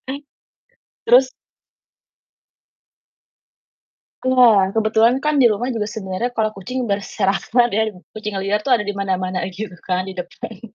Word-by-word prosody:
Eh, 280 +2 -5 0.8
terus 255 +2 +5 2.9
Iya, 240 -7 +5
kebetulan 225 +3 +3
kan 295 0 +1
di 240 - +6
rumah 245 +5 -1
juga 215 -2 -2
sebenarnya 210 +2 -3
kalau 215 -1 +1
kucing 250 +6 -4
berserakan 205 +3 0
ya, 220 +1 +1 0.2
kucing 210 -2 -5
liar 200 +2 0
tuh 240 - -5
ada 210 - -4
dimana-mana 190 -2 -2
aja 190 +1 -7
kan 185 0 -2
di 190 - -7
depan. 185 +3 -8
215 Hz, 125 wpm, -20 LUFS, 195-240 Hz, 2.9 s, di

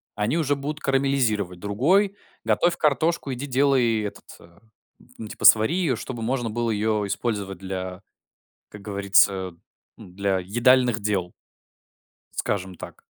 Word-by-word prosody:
они 105 +9 0
уже 145 -3 +1
будут 145 +2 -5
карамелизировать. 125 -9 0
Другой 165 - +1 0.3
готовь 175 0 +2
картошку, 150 -1 0
иди 130 +3 -5
делай 130 -4 +2
этот, 105 - -7
а, 85 +2 -19 0.6
н 110 - -6
типа - - -5
свари 110 +9 +6
её, 165 -9 +1
чтобы 120 +1 -7
можно 120 0 -1
было 115 +1 -1
её 105 0 0
использовать 100 -2 -3
для, 95 -1 -6 0.7
как 105 - -12
говорится, 100 -2 +2 0.5
ну, 90 - -13
для 100 0 -1
едальных 120 +4 +3
дел. 100 -4 -2 1.0
Скажем 95 -2 -3
так. - - -11
110 Hz, 130 wpm, -24 LUFS, 100-135 Hz, 1.0 s, свари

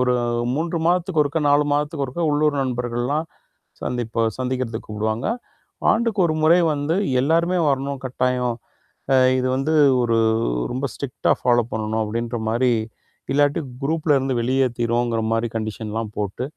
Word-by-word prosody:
ஒரு 125 0 +2 0.4
3 165 +3 -1
மாதத்துக்கு 175 -1 +2
ஒருக்கா, 145 +2 -1
4 145 +1 +4
மாதத்துக்கு 145 0 0
ஒருக்கா 135 +7 -4
உள்ளூர் 150 0 +2
நண்பர்கள் 120 -2 -2
எல்லாம் 150 +5 -1 0.6
சந்திப்ப 115 -2 -1
சந்திக்கிறதுக்கு 125 -3 -3
கூப்பிடுவாங்க. 110 +2 -2 0.6
ஆண்டுக்கு 225 -3 +1
1 155 - 0
முறை 165 +3 +6
வந்து 145 +2 -1 0.3
எல்லாருமே 170 +6 +2
வரணும் 140 0 -1
கட்டாயம். 125 -1 0 0.6
அ, - - +6 0.2
இது 130 - 0
வந்து 135 +4 0 0.3
ஒரு 115 -1 +1 0.5
ரொம்ப 130 +3 -2
ஸ்ட்டிரிக்டா 140 -3 -1
ஃபாலோப் 120 -1 +2
பண்ணனும் 110 0 -1
அப்பிடிங்கிறமாரி 115 +2 -1 0.6
இல்லாட்டி 145 +1 +2 0.2
குரூப்ல 155 0 +1
இருந்து 135 0 -1
வெளியேத்திருவோம்ங்கிறமாரி 120 -2 0
கன்டிஷன்லாம் 110 0 -3
போட்டு, 105 +3 -3
130 Hz, 125 wpm, -22 LUFS, 115-145 Hz, 0.6 s, முறை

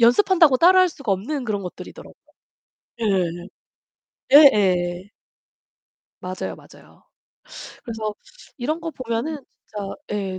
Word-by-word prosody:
연습한다고 320 - +5
따라 370 +6 +6
할 370 - +4
수가 275 - -3
없는 250 +8 -3
그런 205 -3 -3
것들이더라고요. 180 - -10 0.9
예. 180 -4 -1 0.8
예예. 190 - +5 1.1
맞아요, 185 0 -5
맞아요. - - -19 0.8
그래서 220 -2 -5 0.4
이런 300 +6 -3
거 330 0 -5
보면은 255 +3 -4 0.3
진짜 205 -2 -6 0.2
예 195 -3 -3
225 Hz, 245 characters per minute, -22 LUFS, 190-295 Hz, 1.1 s, 따라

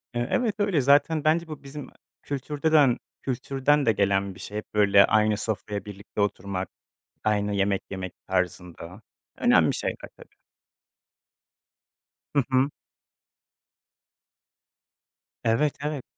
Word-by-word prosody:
Eee, 120 +1 -1
evet, 230 -5 +1
öyle. 195 -8 +2
Zaten 145 +3 +3
bence 165 +2 +2
bu 155 -2 -9
bizim 140 +1 -8 0.3
kültürden- 145 -1 +2 0.2
kültürden 135 +2 0
de 115 - +5
gelen 100 -1 0
bir - - -14
şey. 105 +1 -5
Böyle 100 -1 +6
aynı 110 -1 +2
sofraya 105 -2 -3
birlikte 100 +1 -6
oturmak, 100 -2 -2 0.5
aynı 105 -1 +1
yemek 100 0 +1
yemek 95 -1 -5
tarzında. 90 +1 -3 0.4
Önemli - - +4
şeyler - - -4
tabii. - - -17 2.0
Hı 140 - +4
hı. 130 +2 +3 2.7
Evet, 115 +6 +2
evet. 150 -3 -3
115 Hz, 110 wpm, -26 LUFS, 100-145 Hz, 2.7 s, Böyle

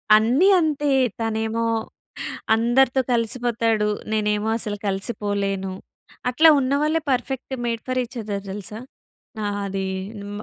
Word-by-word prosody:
అన్నీ 240 - +4
అంతే. 295 -3 0 0.3
తనేమో 225 +1 -1 0.9
అందరితో 245 +3 +3
కలిసిపోతాడు, 230 -2 +1 0.2
నేనేమో 210 0 +1
అసలు 210 -2 -3
కలిసిపోలేను. 195 -1 -2 0.6
అట్లా 310 +7 +5
ఉన్నవాళ్ళే 285 +4 +1
perfect 265 +1 -2
made 230 -1 -2
for 255 0 +1
each 245 +1 -13
other 205 -2 -4
తెలుసా. 210 +2 -6 0.6
ఆ! - - -1 0.2
అది 195 0 -2 0.3
హ్మ్. 205 +1 -6
225 Hz, 110 wpm, -23 LUFS, 210-255 Hz, 0.9 s, అట్లా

